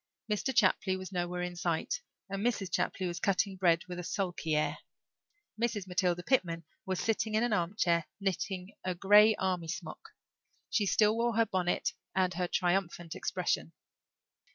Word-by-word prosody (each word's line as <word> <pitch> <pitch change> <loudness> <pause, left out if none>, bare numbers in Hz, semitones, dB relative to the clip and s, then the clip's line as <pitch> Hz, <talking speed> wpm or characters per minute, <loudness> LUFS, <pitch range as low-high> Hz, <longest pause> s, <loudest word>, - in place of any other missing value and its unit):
Mr. 210 +5 0
Chapley 190 -4 +3
was 185 +1 -7
nowhere 180 -1 -2
in 180 0 -4
sight 175 - -1 0.3
and 195 0 -4
Mrs. 205 -6 0
Chapley 185 - 0
was 175 -1 -3
cutting 195 0 +1
bread 175 -2 +3
with 180 -1 -6
a - - -4
sulky 175 -4 -1
air. 150 - 0 0.8
Mrs. 225 -5 0
Matilda 180 -1 0
Pitman 170 -10 +1 0.2
was 185 -1 -1
sitting 220 -1 0
in 220 - +3
an 240 -2 +1
armchair, 170 -3 +1
knitting 190 0 -2
a 185 -1 -1
grey 210 +4 +6
army 185 -4 -1
sock. 160 - -6 0.6
She 205 -3 +2
still 210 +2 +4
wore 235 0 +1
her 230 0 +4
bonnet 180 -4 0 0.2
and 185 -1 +2
her 180 0 -1
triumphant 175 -2 0
expression. 80 +3 -1
185 Hz, 155 wpm, -31 LUFS, 175-205 Hz, 0.8 s, grey